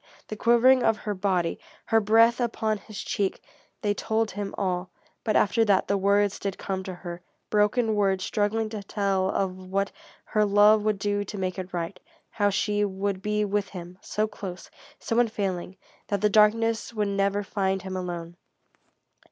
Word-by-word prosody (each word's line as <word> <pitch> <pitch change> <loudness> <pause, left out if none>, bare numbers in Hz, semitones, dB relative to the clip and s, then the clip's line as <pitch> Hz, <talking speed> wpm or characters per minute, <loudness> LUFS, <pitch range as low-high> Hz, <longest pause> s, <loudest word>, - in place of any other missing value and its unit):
The 215 - -4
quivering 240 +4 +5
of 225 -2 +3
her 210 - -3
body, 185 -3 0 0.3
her 225 - +3
breath 225 +3 +5
upon 220 -2 -1
his 205 +1 -10
cheek 195 -2 -1 0.4
they 205 -1 +2
told 220 +1 -1
him 205 0 -5
all. 180 -2 -1 0.3
But 215 - 0
after 225 +3 +3
that, 200 -3 +3
the 200 - +1
words 200 +1 +2
did 195 -1 -3
come 190 -1 -3
to 185 - -5
her; 175 0 -8 0.3
broken 215 +2 +2
words 195 -2 +1
struggling 215 +1 0
to 215 -1 -5
tell 195 -2 0
of 190 -2 -1
what 195 0 0 0.3
her 215 - +1
love 210 +1 +5
would 215 -1 0
do 205 +1 -1
to 205 - -7
make 185 0 -2
it 185 0 -6
right; 170 +1 -4 0.3
how 205 -2 +2
she 205 +1 0
would 195 -1 -2
be 210 +1 0
with 205 -1 -1
him, 180 0 -9
so 215 - -1
close, 195 -4 -8 0.3
so 230 0 -1
unfailing, 195 -6 -1 0.3
that 200 -2 -1
the 210 - +4
darkness 225 +2 +3
would 210 -1 0
never 200 +1 0
find 190 -1 -1
him 190 0 -5
alone. 175 -2 -5
205 Hz, 175 wpm, -26 LUFS, 190-215 Hz, 0.4 s, quivering